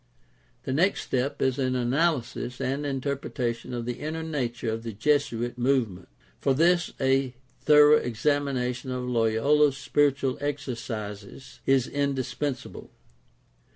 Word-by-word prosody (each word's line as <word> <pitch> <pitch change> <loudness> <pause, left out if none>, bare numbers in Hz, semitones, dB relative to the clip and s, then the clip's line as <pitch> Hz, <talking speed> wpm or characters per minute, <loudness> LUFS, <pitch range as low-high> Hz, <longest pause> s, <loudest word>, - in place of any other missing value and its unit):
The 130 - -2
next 180 +8 +2
step 130 +2 -1
is 130 0 +1
an 130 -1 0
analysis 125 -1 0
and 140 +3 -2
interpretation 130 -3 -3
of 120 -1 -4
the 120 0 -4
inner 160 +2 -4
nature 125 -7 -2
of 110 +1 -3
the 115 -1 -6
Jesuit 120 -1 0
movement. 120 -7 0 0.3
For 135 - +1
this 175 +3 +3
a 135 -1 +1 0.2
thorough 150 0 +6
examina 130 +1 0
tion 130 +1 -8
of 125 0 -3
Loyola's 125 +5 +3
Spiritual 140 -2 +1
Exercises 115 -6 -5
is 135 -2 +4
indispensable. 140 -1 -3
130 Hz, 120 wpm, -26 LUFS, 120-145 Hz, 0.3 s, thorough